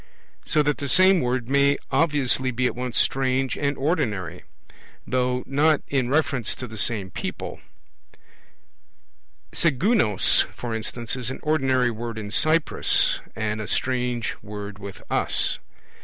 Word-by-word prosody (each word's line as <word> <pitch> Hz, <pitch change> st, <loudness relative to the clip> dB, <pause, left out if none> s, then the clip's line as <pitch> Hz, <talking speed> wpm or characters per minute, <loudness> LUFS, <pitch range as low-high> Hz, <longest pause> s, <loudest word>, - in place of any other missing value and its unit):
So 155 Hz, -2 st, +3 dB
that 145 Hz, 0 st, 0 dB
the 140 Hz, -, -3 dB
same 185 Hz, +1 st, +5 dB
word 125 Hz, -1 st, -1 dB
may 140 Hz, +1 st, +3 dB
obviously 135 Hz, -3 st, +1 dB
be 125 Hz, 0 st, -1 dB
at -, -, 0 dB
once 125 Hz, -1 st, -3 dB
strange 130 Hz, -1 st, +1 dB
and 140 Hz, -1 st, -1 dB
ordinary, 135 Hz, -, -2 dB, 0.6 s
though 125 Hz, -1 st, 0 dB
not 150 Hz, +3 st, +2 dB
in 130 Hz, -3 st, 0 dB
reference 140 Hz, -5 st, 0 dB
to 130 Hz, -, -7 dB
the 110 Hz, -2 st, -4 dB
same 100 Hz, -4 st, 0 dB
people; -, -, -6 dB, 1.9 s
sigunos, 165 Hz, -, +2 dB
for 120 Hz, -2 st, -5 dB
instance, 115 Hz, +2 st, -3 dB
is 125 Hz, -2 st, -1 dB
an 130 Hz, -, -6 dB
ordinary 130 Hz, -5 st, +2 dB
word 115 Hz, 0 st, -6 dB
in 105 Hz, -2 st, -6 dB
Cyprus, 155 Hz, +6 st, +3 dB, 0.2 s
and 110 Hz, -1 st, -2 dB
a 105 Hz, -, -6 dB
strange 125 Hz, -1 st, -1 dB
word 105 Hz, -1 st, -8 dB
with 100 Hz, -1 st, -9 dB
us. -, -, +1 dB
125 Hz, 135 wpm, -24 LUFS, 115-140 Hz, 1.9 s, same